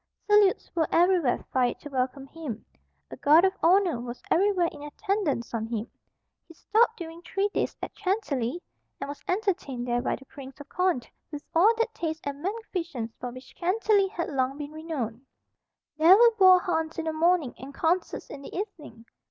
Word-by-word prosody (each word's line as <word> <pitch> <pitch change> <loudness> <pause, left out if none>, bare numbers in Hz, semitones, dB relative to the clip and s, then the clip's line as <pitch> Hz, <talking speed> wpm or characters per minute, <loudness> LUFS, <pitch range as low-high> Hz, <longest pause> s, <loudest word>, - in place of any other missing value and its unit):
Salutes 415 -2 +3
were 325 -2 +2
everywhere 345 -6 +3
fired 250 -2 +1
to 295 - -8
welcome 265 0 -2
him. 275 -7 -7 0.5
A - - -8
guard 315 +5 +6
of 380 - +2
honour 355 -5 +4
was 240 0 -8
everywhere 375 -1 +3
in 290 - -12
attendance 295 - -2
on 225 -1 -2
him. 225 0 -4 0.6
He 330 - -15
stopped 450 +6 +2
during 335 -1 -8
three 390 +4 -1
days - - -2
at - - -5
Chantilly, 350 - -2 0.4
and - - -4
was 285 0 -7
entertained 355 - -1
there 240 0 +1
by - - -1
the 270 - -14
Prince 270 -1 -12
of 285 - -11
Condé 360 -9 0 0.2
with 295 0 -6
all 405 +8 +5
that 460 0 -1
taste 320 -1 -4
and 285 0 -4
magnificence 345 - -4
for 250 - -4
which 255 +2 -12
Chantilly 400 +2 +2
had 375 -3 -4
long 265 0 0
been 295 0 -6
renowned. 285 -7 -5 0.7
There 335 +5 +8
were 470 +1 +7
boar 375 -3 +7
hunts 320 -3 -2
in 330 - -3
the 320 - -1
morning 330 -4 +2
and 265 +2 -8
concerts 340 +5 -1
in 280 - -8
the - - -10
evening. 295 - -7
320 Hz, 180 wpm, -27 LUFS, 270-375 Hz, 0.7 s, There